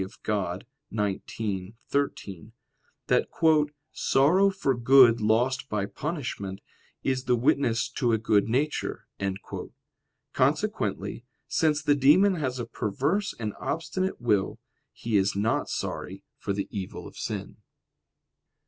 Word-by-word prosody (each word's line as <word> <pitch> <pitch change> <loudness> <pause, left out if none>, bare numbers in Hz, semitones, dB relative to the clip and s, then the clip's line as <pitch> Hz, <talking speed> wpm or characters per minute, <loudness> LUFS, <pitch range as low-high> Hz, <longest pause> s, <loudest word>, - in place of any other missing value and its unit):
Dei 105 +2 -3
xix, 100 -2 -4 0.2
13), 110 -8 -2 0.5
that - - +2 0.6
"sorrow 175 +9 +4
for 190 -8 0
good 120 -1 +6
lost 125 +6 +1
by 105 -2 -1
punishment, 120 - -4 0.4
is 130 -1 0
the 125 - +3
witness 120 -1 +2
to 120 -2 0
a 110 - +3
good 105 -1 +2
nature." 145 +6 -1 1.3
Consequently, - - 0 0.2
since 155 -2 +1
the 145 -2 +4
demon 155 +9 +5
has 135 -7 -2
a 120 - -3
perverse 140 - -1
and 105 -2 -3
obstinate 185 +4 -2
will, 105 -5 +1 0.3
he 115 -2 -1
is 95 0 +2
not 110 +3 0
sorry - - -4
for - - -4
the 100 0 -2
evil 95 -3 -5
of - - -11
sin. - - -5
120 Hz, 115 wpm, -27 LUFS, 105-145 Hz, 1.3 s, good